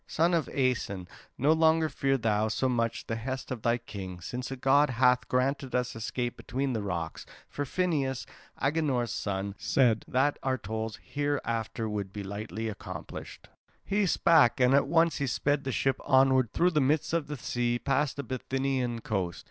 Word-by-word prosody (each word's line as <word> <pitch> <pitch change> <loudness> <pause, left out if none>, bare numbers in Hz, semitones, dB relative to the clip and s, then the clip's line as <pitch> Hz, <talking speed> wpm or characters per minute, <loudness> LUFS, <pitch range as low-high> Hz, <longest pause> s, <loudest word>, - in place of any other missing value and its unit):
Son 170 +3 +2
of 165 -4 +1
Aeson, 125 -9 -1 0.3
no 145 +4 +3
longer 160 0 +4
fear 135 -1 0
thou 110 -2 +1
so 130 +4 0
much 115 -2 -1
the 115 - -3
hest 130 +4 -5
of 125 -4 -4
thy 115 +1 +2
king, 95 -6 -8
since 125 +9 -5
a 135 - -4
god 140 +3 +4
hath 125 0 +3
granted 130 +1 0
us 125 -1 -1
escape 120 +2 -3
between 135 +1 -2
the 110 - -1
rocks; 85 -5 -4 0.2
for 145 - -4
Phineus, 140 -6 -1 0.3
Agenor's 135 -5 0
son, 100 -3 -3
said 120 -2 +2
that 145 0 +1
our 130 -1 0
toils 110 +1 -4
hereafter 115 -6 -2
would 100 -3 -3
be 105 0 -6
lightly 105 +3 -5
accomplished." 90 -6 -8 0.4
He 200 0 +1
spake, 160 -9 +4
and 125 +1 +5
at 140 0 +4
once 165 +1 +3
he 140 - -1
sped 145 +3 0
the 135 - -1
ship 135 +1 0
onward 130 -3 +4
through 180 +1 +3
the 150 -3 +2
midst 145 +4 +1
of 165 -3 0
the 150 0 -5
sea 120 0 -1
past 140 +1 0
the 140 - -4
Bithynian 130 -2 -2
coast. 95 -6 -2
130 Hz, 175 wpm, -29 LUFS, 115-140 Hz, 0.4 s, and